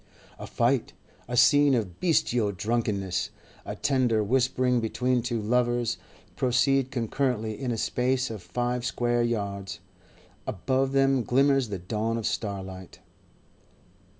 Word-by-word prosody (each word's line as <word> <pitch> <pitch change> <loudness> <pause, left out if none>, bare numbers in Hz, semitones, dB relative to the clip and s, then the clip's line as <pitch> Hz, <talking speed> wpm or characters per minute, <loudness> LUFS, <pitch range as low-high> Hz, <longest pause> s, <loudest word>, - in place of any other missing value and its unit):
A - - -7
fight, 120 +1 0 0.3
a 120 +1 -3
scene 145 +1 +6
of 100 -7 -3
bestial 125 - +2
drunkenness, 100 -2 -1 0.4
a - - -4
tender 125 -6 +1
whispering 125 +2 +2
between 125 +2 0
two 120 -1 -2
lovers, 120 +1 0 0.4
proceed 130 +1 +2
concurrently 120 -3 -1
in 130 -2 -1
a 115 - -2
space 125 +2 0
of 110 -4 -6
five 120 +7 -2
square 120 0 0
yards. 100 -4 -3 0.7
Above 130 +7 0
them 135 -1 +3
glimmers 135 0 +2
the 100 - -3
dawn 110 +5 -2
of 115 - -4
starlight. 95 -4 -4
120 Hz, 125 wpm, -27 LUFS, 105-130 Hz, 0.7 s, scene